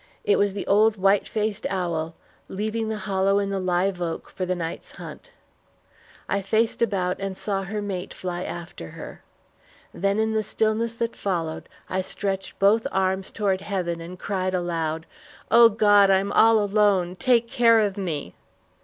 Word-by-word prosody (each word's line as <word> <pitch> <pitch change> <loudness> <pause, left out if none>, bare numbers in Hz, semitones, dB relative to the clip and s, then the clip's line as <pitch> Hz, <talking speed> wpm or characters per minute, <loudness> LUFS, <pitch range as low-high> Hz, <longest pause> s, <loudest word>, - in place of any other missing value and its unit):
It 205 - +3
was 200 -1 +2
the 200 - -4
old 215 +2 +4
white 195 +1 +3
faced 215 -1 -2
owl 170 -4 -2 0.3
leaving 220 +3 -3
the 220 - -2
hollow 195 0 +2
in 200 -1 0
the 195 - -1
live 180 0 0
oak 165 -1 -4
for 185 - -4
the 185 - 0
night's 165 -2 -6
hunt. - - -10 1.0
I 200 - 0
faced 220 +5 0
about 190 -5 0
and 195 -1 -4
saw 195 -2 -2
her 205 +2 -4
mate 190 -2 -4
fly 180 -1 -5
after 170 - -7
her. - - -9 0.7
Then 200 +2 0
in 220 0 +1
the 220 - +1
stillness 220 +2 0
that 230 0 -2
followed, 165 -5 -3 0.2
I 185 - -1
stretched 195 0 -4
both 210 +3 +3
arms 190 0 0
toward 195 -3 -1
heaven 180 -4 -3
and 175 +2 -8
cried 185 -1 -2
aloud, 165 -2 -2 0.5
"O 235 0 +8
God, 205 -2 +5
I'm 195 +1 +2
all 225 +1 +5
alone; 205 -3 +2
take 235 +3 +2
care 230 -1 +4
of 205 -3 +1
me!" 155 - -4
195 Hz, 165 wpm, -24 LUFS, 185-215 Hz, 1.0 s, O